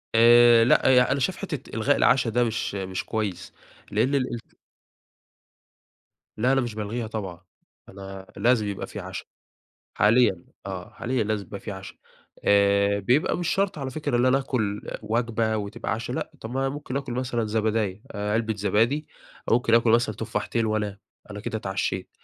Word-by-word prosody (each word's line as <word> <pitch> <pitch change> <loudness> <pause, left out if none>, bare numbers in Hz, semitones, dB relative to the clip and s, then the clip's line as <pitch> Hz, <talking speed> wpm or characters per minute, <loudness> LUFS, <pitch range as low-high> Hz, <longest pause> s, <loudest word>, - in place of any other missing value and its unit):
آآ 120 0 +7
لأ، 125 - +4
يع 125 -1 +5
أنا 140 - +1
شايف 125 - 0
حتة - - -6
إلغاء - - +2
العشا، 125 -3 +3
ده 120 +2 +2
مش 115 -3 -2
مش 95 -1 -3
كويّس، 105 -5 -3 0.4
لإن 135 +3 +2
الإلت 125 -4 -3 1.8
لا 125 +4 +2
أنا 135 - +3
مش 120 -3 -4
بالغيها 110 +2 -3
طبعًا، 95 -6 -6 0.5
أنا 95 0 -9
لازم 115 -3 +3
يبقى 100 -1 -4
في - - -7
عشا، - - -7 0.7
حاليًا 105 -4 +3 0.2
آه، 95 -2 -6
حاليًا 125 -2 -1
لازم 105 -2 -2
يبقى 100 - -8
في - - -7
عشا. 95 -1 -9 0.5
آآ 100 0 +4
بيبقى 125 - +2
مش 175 -1 -2
شرط 195 -3 0
على 135 -2 -4
فكرة 145 -2 -2
إن 120 +1 +3
أنا 130 +1 +4
اكُل 110 -7 -2 0.2
وجبة 110 0 0
وتبقى 105 +2 -4
عشا 115 +3 -4
لأ، - - -3
طب 110 - -7
ما 130 +2 -2
أنا 135 - +1
ممكن 140 -1 -5
آكُل 135 -3 -3
مثلًا 120 -2 -1
زبداية، 110 -2 -1
علبة 110 +2 -1
زبادي 115 +9 +1 0.4
أو - - +4
ممكن 115 -1 +2
آكُل 115 0 +4
مثلًا 115 -1 +3
تفاحتين 115 +3 -2
وانام، 105 -2 -2 0.3
أنا 105 0 -6
كده 110 - -3
اتعشيت. 95 -2 -3
110 Hz, 165 wpm, -25 LUFS, 100-125 Hz, 1.8 s, آآ